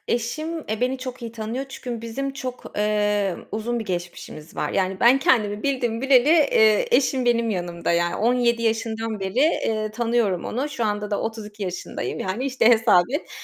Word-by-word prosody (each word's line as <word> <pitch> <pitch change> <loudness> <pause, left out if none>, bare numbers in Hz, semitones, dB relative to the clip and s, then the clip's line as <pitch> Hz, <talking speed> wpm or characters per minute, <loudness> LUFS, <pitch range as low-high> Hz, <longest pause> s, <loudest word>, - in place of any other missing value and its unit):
Eşim, 310 +8 -2
eee, 215 +1 -2
beni 255 +2 0
çok 255 -1 -7
iyi 230 -1 -6
tanıyor 235 +4 -4
çünkü 245 -3 -6
bizim 270 +4 -4
çok, 255 -2 -6
eee, 210 -3 +1 0.2
uzun 235 +3 -2
bir 225 - -4
geçmişimiz 175 -4 -6
var. - - -1
Yani, 190 0 -1
ben 245 +3 +6
kendimi 210 -6 +2
bildim 250 -5 -1
bileli, 270 0 +4
eee, 275 -10 +4
eşim 260 -1 +1
benim 235 -1 +2
yanımda, 175 -3 -2
yani, 170 0 +1
17 235 0 +2
yaşından 225 -1 -1
beri, 190 +4 -3
eee, 220 -7 +1
tanıyorum 230 -5 0
onu. 260 +6 -2
Şu 245 -5 -3
anda 210 0 -2
da 205 - -1
32 215 -2 -6
yaşındayım, 180 -2 -4
yani, 190 +7 -2
işte, 260 -4 +1
hesap 220 -6 +5
et. 290 +5 -3
225 Hz, 175 wpm, -23 LUFS, 210-250 Hz, 0.2 s, ben